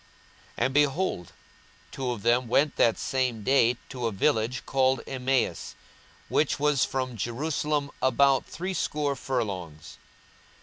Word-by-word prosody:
42:024:013 - - +1
And, 130 - -1
behold, 145 - 0 0.6
two 130 -2 -3
of 120 -5 -4
them 120 +1 +2
went 140 +5 +2
that 115 - +3
same 125 -5 -1
day 125 -1 +3
to 125 -3 -3
a - - -1
village 115 +3 0
called 130 -2 +2
Emmaus, 130 0 -1 0.5
which 150 -1 +1
was 145 -2 +2
from 130 -2 -2
Jerusalem 145 +5 -2
about 135 0 +3
threescore 150 -5 -2
furlongs. 95 - -4
130 Hz, 125 wpm, -27 LUFS, 120-140 Hz, 0.6 s, that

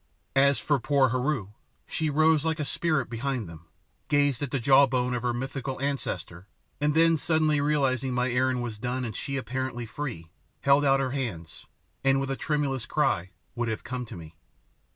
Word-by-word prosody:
As 140 0 +5
for 145 -2 +1
poor 135 +1 +3
Heru, 130 -4 -1 0.4
she 160 -1 -2
rose 155 +1 +3
like 160 0 -1
a 150 - -1
spirit 155 -2 0
behind 120 -1 -3
them, 85 0 -12 0.4
gazed 145 -3 +2
at 145 - -2
the 135 - -1
jaw 135 +3 +6
bone 125 -1 0
of 120 - -1
her 125 0 0
mythical 130 +2 -4
ancestor, 100 - -3 0.3
and 150 0 +1
then 165 0 +5
suddenly 155 -2 +2
realising 135 -3 +1
my 125 0 0
errand 125 0 +1
was 110 -3 -5
done 125 +2 -2
and 110 -3 -5
she 140 -1 -3
apparently 130 -1 -3
free, 115 - -6 0.3
held 140 +1 +4
out 135 -1 +4
her 130 -1 -1
hands, 110 - -5 0.4
and, 135 0 +3
with 135 0 -2
a - - 0
tremulous 140 -4 -1
cry, 95 - +1 0.2
would 120 -1 -2
have 110 - -3
come 125 0 -4
to - - -9
me. 80 -2 -10
130 Hz, 185 wpm, -27 LUFS, 120-145 Hz, 0.4 s, jaw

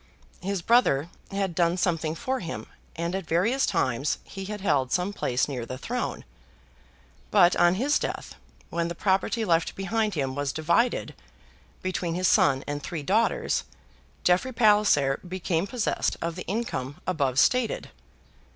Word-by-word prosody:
His 195 -1 -2
brother 170 - +3 0.2
had 195 -2 -2
done 170 +1 +2
something 165 -3 0
for 260 +8 -2
him, 165 - -5 0.3
and 170 +1 -2
at 190 -3 -3
various 225 +11 +2
times 130 +3 0
he 195 -1 -8
had 210 +1 -5
held 135 -9 +1
some 185 +3 0
place 125 -10 0
near 130 -4 -4
the 130 +2 -6
throne. 245 - -3 1.0
But 180 -4 +5
on 175 +1 +4
his 275 +8 +2
death, - - -4 0.4
when 170 0 0
the 170 - -5
property 195 +5 +1
left 165 -3 +1
behind 210 +2 -1
him 135 -3 -1
was 145 -1 -2
divided 170 +10 +1 0.7
between 180 -2 -2
his 185 +1 +1
son 135 -3 +4
and 145 0 -4
three 160 -2 -5
daughters, 215 +9 +1 0.6
Jeffrey 180 +9 +2
Palliser 210 - +4
became 180 0 -1
possessed 230 0 -1
of 170 0 -3
the 180 - -7
income 180 - -3
above 140 -8 0
stated. 245 - +2
175 Hz, 150 wpm, -26 LUFS, 155-205 Hz, 1.0 s, But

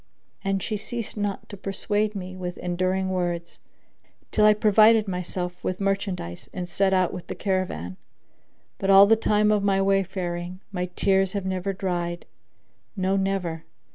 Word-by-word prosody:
And 195 -1 0
she 215 - -2
ceased 230 +1 -6
not 205 -2 -3
to - - -7
persuade 205 +2 -1
me 185 -1 -6
with 180 -1 -5
endearing 185 +2 -1
words, 175 -2 -3 0.7
till 210 - +4
I 210 - +6
provided 215 +1 +5
myself 180 -1 -4
with 185 - -2
merchandise 195 - -2
and 180 -2 -5
set 190 +2 +1
out 185 -2 +2
with 180 - -7
the - - -5
caravan. 185 - -2 0.8
But 195 - -1
all 195 0 +9
the 225 +2 +5
time 210 -1 +2
of 210 -1 +3
my 195 -1 +2
wayfaring, 185 -2 -1
my 180 -2 -2
tears 195 -1 +2
have 200 -2 -3
never 190 +1 -1
dried; 175 -2 -3 0.7
no, 190 +1 +1
never! 190 -4 -1
190 Hz, 155 wpm, -25 LUFS, 180-200 Hz, 0.8 s, all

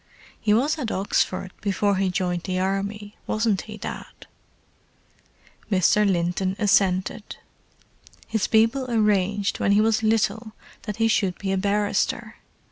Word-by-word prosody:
"He 215 - 0
was 280 +9 +2
at 245 -6 -3
Oxford 190 -1 -1
before 200 0 0
he 190 0 +1
joined 180 -1 -1
the 185 -1 -2
Army, 200 +2 -3
wasn't 215 -3 0
he, 215 - -7
Dad?" - - -8 1.5
Mr. 200 +2 +3
Linton 180 +2 -1
assented. 195 0 +1 0.9
"His 220 -3 -1
people 230 +4 +2
arranged 205 -3 +1
when 200 - +2
he 205 - +4
was 220 0 +2
little 220 0 0 0.3
that 210 - -3
he 225 0 +2
should 195 -5 +1
be 195 -1 -3
a 195 - +1
barrister. 205 +1 -1
205 Hz, 130 wpm, -24 LUFS, 190-220 Hz, 1.5 s, he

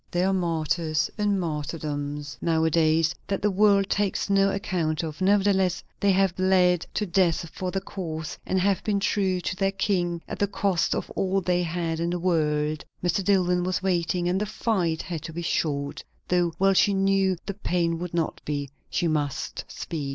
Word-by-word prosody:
There 175 +2 +1
are - - +1
martyrs 165 -3 0
and 205 -2 +1
martyrdoms 150 -2 -4
now 160 -1 +1
a 160 - +2
days, 160 0 +3
that 195 -1 -1
the 210 - +3
world 200 0 +4
takes 200 0 0
no 195 0 +4
account 170 -5 -1
of; 160 +2 -6
nevertheless 190 -2 +2 0.2
they 200 - +3
have 190 -1 +2
bled 185 -2 +3
to 210 - 0
death 175 -3 +1
for 185 - -3
the 195 +1 -2
cause, 160 -5 -5
and 190 - 0
have 195 +1 +1
been 205 -2 +1
true 195 -2 +1
to 175 - -3
their 195 0 +1
King 180 -3 0
at - - -6
the 205 - +2
cost 195 -3 0
of - - -4
all 195 0 0
they 180 -1 +1
had 165 -1 -2
in 170 +1 0
the 175 - -1
world. 155 -3 0 0.2
Mr. 180 +3 +1
Dillwyn 180 -2 +2
was 185 +1 -1
waiting, 175 -1 0
and 185 +3 +1
the 210 - -1
fight 180 -8 -1
had 170 -4 -5
to 160 - -8
be 170 +1 -4
short, 145 -2 -1 0.3
though 175 -1 +2
well 195 +1 +4
she 200 +1 +4
knew 195 -1 +2
the 200 - -3
pain 170 -4 -1
would 175 -1 -5
not 165 -2 -1
be. 145 -2 -3 0.2
She 175 - 0
must 145 -4 -2
speak. 165 -3 -5
180 Hz, 190 wpm, -26 LUFS, 160-195 Hz, 0.3 s, world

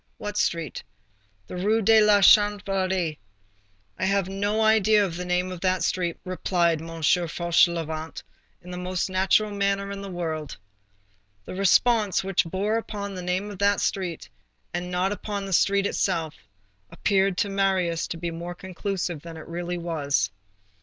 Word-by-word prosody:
"What 210 0 -5
street?" 165 - -1 0.6
"The - - -8
Rue 215 +4 +1
de 220 +2 +6
la 210 -1 +5
Chanvrerie." 195 -5 +3 0.8
"I - - 0
have 195 -1 +1
no 205 +3 0
idea 215 -1 +4
of 170 -4 -5
the 180 +1 -5
name 180 +1 0
of 180 -2 -7
that 185 -1 +1
street," 175 -2 -1
replied 175 -3 0
M. 165 0 -8
Fauchelevent, 170 -1 +1 0.4
in 180 - -10
the 180 - -5
most 185 +1 -2
natural 195 +3 +2
manner 200 0 -1
in 200 0 -6
the 200 - -7
world. 160 -4 -4 0.9
The - - -7
response 200 +2 +3
which 195 -1 +1
bore 200 +6 -1
upon 200 -3 -5
the 185 - -6
name 185 +3 -2
of 195 - -10
the 200 0 +3
street 180 -4 -2 0.5
and 175 +1 -3
not 180 +2 0
upon 205 -1 -4
the 195 - -4
street 200 +2 +3
itself, 165 -6 -1 0.6
appeared 195 -2 +1
to 200 - 0
Marius 190 -4 +1
to 170 - -5
be 170 0 -4
more 170 +2 -6
conclusive 185 -3 -4
than 165 0 -9
it 155 - -10
really 175 +1 -4
was. 145 - -1
185 Hz, 160 wpm, -25 LUFS, 170-200 Hz, 0.9 s, de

